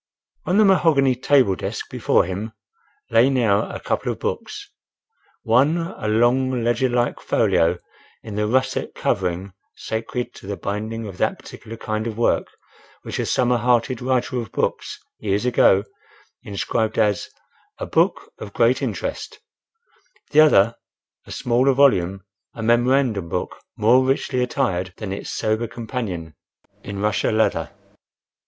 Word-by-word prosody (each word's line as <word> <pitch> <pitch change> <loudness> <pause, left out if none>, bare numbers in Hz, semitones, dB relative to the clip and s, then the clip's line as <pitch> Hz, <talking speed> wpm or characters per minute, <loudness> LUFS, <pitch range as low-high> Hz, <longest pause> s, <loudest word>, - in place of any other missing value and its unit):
On 180 - +2
the 215 - +6
mahogany 160 -9 +4
table 125 -5 +3
desk - - -5
before - - +2
him 100 +5 -5 0.6
lay 120 +4 +5
now 115 -7 +2
a - - -6
couple - - -2
of - - -6
books: - - -5 0.7
one 135 +9 +3
a 165 -10 -4
long, 120 +3 +2
ledger 120 +2 +1
like 120 0 0
folio 85 +2 +2 0.5
in 110 - -8
the 105 +1 -1
russet 130 +4 0
covering 90 +2 -2 0.2
sacred 120 +2 -4
to - - -13
the 100 -1 -4
binding 110 +3 -4
of 95 -3 -9
that - - +1
particular 115 +1 -11
kind 110 0 -3
of 110 -2 -5
work 120 - +1 0.6
which - - -5
a - - -1
summer 125 -1 +2
hearted 120 +1 +1
Writer 130 0 0
of 110 - -9
books - - -2 0.2
years 100 +2 -1
ago 100 -5 +4 0.6
inscribed 110 +3 -2
as 105 -3 +1 0.5
"a - - -4
book - - 0
of 100 - -8
great 120 +2 +2
interest;" - - -4 0.9
the 150 - +4
other, 115 -8 +5 0.5
a - - -10
smaller 125 +3 +2
volume, 95 -9 +3 0.3
a 115 - -5
memorandum 120 -5 +2
book, 90 - -3 0.2
more 120 +5 +4
richly 130 -1 0
attired 95 -8 -1
than 100 -3 -5
its 100 - -6
sober 110 +2 -1
companion, 110 - -5 0.5
in 100 - -7
Russia 105 +1 0
leather. 110 0 +1
115 Hz, 140 wpm, -22 LUFS, 105-125 Hz, 0.9 s, the